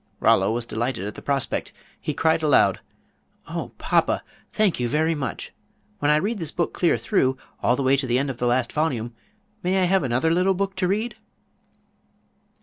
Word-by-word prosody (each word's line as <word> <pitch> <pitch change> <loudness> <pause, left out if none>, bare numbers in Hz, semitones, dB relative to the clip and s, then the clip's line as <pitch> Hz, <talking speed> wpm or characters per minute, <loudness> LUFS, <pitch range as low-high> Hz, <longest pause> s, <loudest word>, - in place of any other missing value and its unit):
Rollo 95 +2 +4
was 115 +1 -2
delighted 115 -3 -2
at 105 - -4
the - - -10
prospect. 140 -2 -2 0.3
He - - -3
cried 160 0 +2
aloud: 150 -3 +4 0.7
"Oh, - - -5
papa! - - +1 0.3
thank 210 - +1
you 120 -1 0
very 160 +4 +2
much. 145 -4 -5 0.5
When 145 - +1
I 150 - +5
read 205 +8 0
this 165 -4 0
book 170 +1 -2
clear 170 -8 +2
through, 130 +3 +1 0.2
all 125 - +3
the 140 - -2
way 130 +1 +4
to 135 -1 -2
the 120 0 +2
end 135 +1 0
of 125 - -9
the 120 - +1
last 120 0 +1
volume, 125 -7 -1 0.5
may 185 +2 +1
I - - +3
have 190 +2 +3
another 130 +4 +1
little 185 +3 +2
book 195 +1 -2
to 185 -1 +1
read?" 215 +5 -1
145 Hz, 190 wpm, -24 LUFS, 125-180 Hz, 0.7 s, I